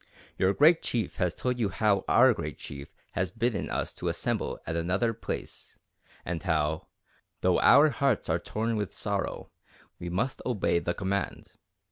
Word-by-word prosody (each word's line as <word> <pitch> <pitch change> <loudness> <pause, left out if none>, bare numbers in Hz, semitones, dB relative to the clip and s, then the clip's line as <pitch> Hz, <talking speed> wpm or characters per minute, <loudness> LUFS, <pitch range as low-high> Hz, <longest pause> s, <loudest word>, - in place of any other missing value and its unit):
Your 95 - +3
Great 160 +3 +6
Chief 115 -3 -2
has 90 -2 0
told 125 -1 -2
you 110 -4 +1
how 100 0 +2
our 130 +1 +6
Great 75 -8 -5
Chief 70 0 -8 0.2
has 90 0 -1
bidden 115 +1 -1
us - - -2
to - - -5
assemble - - -2
at 80 - -3
another 95 +8 +1
place - - -7 0.5
and 85 -1 -3
how, 80 -4 0 0.5
though - - +3
our 145 +3 +7
hearts 135 -3 0
are 80 +1 +1
torn 110 +5 -2
with 105 -2 -4
sorrow, 100 -2 -3 0.5
we 85 - -5
must 120 +10 -2
obey 105 -8 +1
the 85 0 -2
command. 100 0 -3
100 Hz, 160 wpm, -28 LUFS, 85-120 Hz, 0.5 s, our